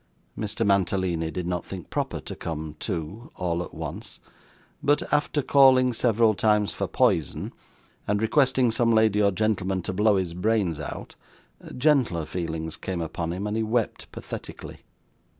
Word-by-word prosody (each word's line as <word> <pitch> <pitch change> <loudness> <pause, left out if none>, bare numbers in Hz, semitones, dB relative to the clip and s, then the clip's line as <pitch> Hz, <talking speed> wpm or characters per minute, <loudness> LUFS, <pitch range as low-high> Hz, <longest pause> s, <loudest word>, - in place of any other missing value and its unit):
Mr. 110 +1 -2
Mantalini 95 -4 +1
did 85 +2 -4
not 90 -1 -2
think 95 -3 -9
proper - - -2
to - - -7
come 80 -1 -5
to, 90 +8 -5
all 85 -1 -1
at - - -10
once; - - -7 0.6
but, 145 +1 +2
after 145 0 +1
calling 130 -2 +5
several 115 -1 +3
times 105 +1 +2
for - - -2
poison, 80 -4 0 0.5
and 105 0 +1
requesting 130 +1 +3
some 115 +1 +2
lady 110 -2 +4
or 100 - +5
gentleman 95 -2 0
to 95 - -3
blow 105 +2 +3
his 90 -3 -1
brains 90 -3 0
out, 75 - -7 0.6
gentler 125 - +2
feelings 80 -2 -4
came 95 -2 -4
upon 85 0 -3
him, 95 +4 -4
and 105 +1 -2
he - - +1
wept 110 +1 -1
pathetically. - - -8
100 Hz, 150 wpm, -25 LUFS, 85-115 Hz, 0.6 s, calling